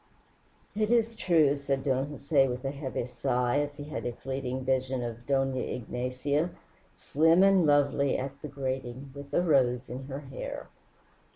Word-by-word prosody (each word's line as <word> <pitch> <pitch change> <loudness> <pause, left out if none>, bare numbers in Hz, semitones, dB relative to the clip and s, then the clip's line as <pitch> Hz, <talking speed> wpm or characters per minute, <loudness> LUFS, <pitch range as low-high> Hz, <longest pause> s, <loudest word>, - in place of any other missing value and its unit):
"It 215 0 +1
is 230 -1 +2
true," 160 -8 +3
said 140 -1 -2
Don 135 -1 +1
Jose, 140 -1 +2
with 125 +1 -4
a 135 - 0
heavy 140 -4 -4
sigh, 125 +2 0
as 145 0 -3
he 145 - -6
had 150 +1 -5
a 120 - -3
fleeting 130 +1 -4
vision 130 -1 0
of 120 0 -6
Dona 135 -2 +1
Ignacia, 125 +6 -2 0.5
slim 165 +5 +4
and 195 -4 +5
lovely, 140 -1 +3
at 140 +1 -5
the - - -5
grating, 130 -1 -4
with 140 0 -10
a 175 - +2
rose 130 -6 +2
in 130 +2 -6
her 135 +1 -6
hair. 135 -2 -7
135 Hz, 165 wpm, -29 LUFS, 130-145 Hz, 0.5 s, and